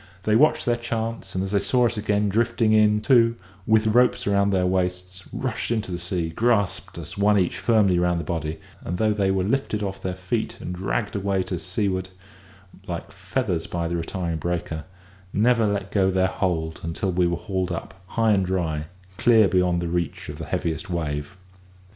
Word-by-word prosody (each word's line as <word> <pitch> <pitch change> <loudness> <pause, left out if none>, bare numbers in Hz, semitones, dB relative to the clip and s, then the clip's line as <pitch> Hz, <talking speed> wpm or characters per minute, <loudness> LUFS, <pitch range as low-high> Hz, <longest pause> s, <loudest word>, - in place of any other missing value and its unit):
They 105 - +2
watched 150 +7 +4
their 120 -1 +2
chance, 115 -4 -4
and 95 - 0
as 95 - -4
they 100 - +3
saw 125 +4 +2
us 115 0 +1
again 105 -1 +1
drifting 115 +2 +2
in, 105 -1 +4
two, 115 0 +4 0.3
with 110 0 +4
ropes 120 +3 +3
round 100 0 +2
their 95 -2 +2
waists, 90 0 -2
rushed 130 -4 -3
into 110 -4 -1
the 85 - -3
sea, 90 -1 -2
grasped 100 -3 0
us, 85 +3 -7
one 105 +1 +4
each, 90 -1 0
firmly 100 -3 +3
round 90 -1 +1
the - - -3
body; 80 -2 -3 0.3
and, 90 - -3
though 110 +2 +2
they 100 -2 +1
were 95 -1 +1
lifted 105 -1 -1
off 95 -1 -4
their 90 -1 -3
feet 90 -1 -3
and 90 - -5
dragged 100 +4 -2
away 100 -1 0
to 90 -2 -4
seaward 95 +1 -2 0.8
like 85 -1 -5
feathers 95 -2 -2
by 85 -1 -2
the 85 - -2
retiring 85 0 -3
breaker, 85 -3 -3 0.5
never 115 +1 +3
let 100 -1 -2
go 95 -2 +3
their 95 0 +2
hold 85 -4 -1
until 85 +4 -2
we 90 0 +2
were 85 0 -1
hauled 95 -1 -2
up - - -5
high 115 +2 +2
and 95 -3 +2
dry, 80 -5 -1 0.3
clear 115 -4 +6
beyond 90 -2 +2
the - - -2
reach 85 -1 -3
of - - -7
the - - -5
heaviest 80 +3 -2
wave. 75 -1 -3
95 Hz, 190 wpm, -24 LUFS, 90-110 Hz, 0.8 s, clear